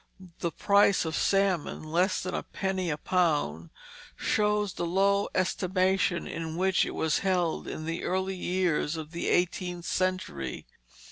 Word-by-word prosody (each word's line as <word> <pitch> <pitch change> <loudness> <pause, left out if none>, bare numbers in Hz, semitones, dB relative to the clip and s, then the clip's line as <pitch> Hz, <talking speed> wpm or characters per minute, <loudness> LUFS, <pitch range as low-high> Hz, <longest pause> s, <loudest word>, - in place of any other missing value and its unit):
The 170 - -1
price 200 -1 +3
of 160 -1 -2
salmon 195 -7 +1
less 175 +5 +1
than 185 - -4
a - - -1
penny 190 -2 -2
a 150 - -1
pound 145 - 0 0.5
shows 210 -2 +1
the 170 - -3
low 200 +3 +2
estimation 185 -1 +1
in 160 -1 -5
which 190 +2 +2
it - - -5
was 160 -1 +1
held 180 -4 0
in 155 - -5
the 165 +1 -3
early 190 +1 -1
years 180 -4 0
of 155 -1 -7
the 170 - -3
eighteenth 175 0 0
century. 180 - -2
180 Hz, 145 wpm, -28 LUFS, 165-190 Hz, 0.5 s, price